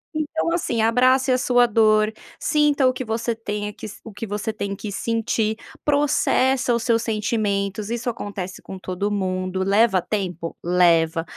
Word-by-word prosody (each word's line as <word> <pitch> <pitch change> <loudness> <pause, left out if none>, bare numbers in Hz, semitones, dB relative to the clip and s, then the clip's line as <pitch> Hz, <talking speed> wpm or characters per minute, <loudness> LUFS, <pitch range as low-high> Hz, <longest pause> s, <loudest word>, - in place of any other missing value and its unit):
Então 310 +2 -1
assim, 245 -9 0
abrace 255 +3 +3
a 255 - +4
sua 245 -1 +3
dor, 215 -1 +3 0.3
sinta 295 -3 +2
o 255 - +2
que 255 0 -5
você 225 +1 -2
tenha 210 -2 -4
que 220 - -10 0.2
o 225 - -9
que 210 - -6
você 210 +1 -3
tem 200 -2 -4
que 205 +1 -6
sentir, 225 0 -1 0.3
processa 270 -3 +2
os 235 - 0
seus 230 -1 +1
sentimentos, 210 -2 -1
isso 240 +1 -2
acontece 200 -4 -6
com 190 -1 -9
todo 185 +3 -3
mundo. 185 -1 -1
Leva 200 0 +3
tempo? 180 -5 -4
Leva, 165 -2 +3
220 Hz, 160 wpm, -22 LUFS, 200-245 Hz, 0.3 s, a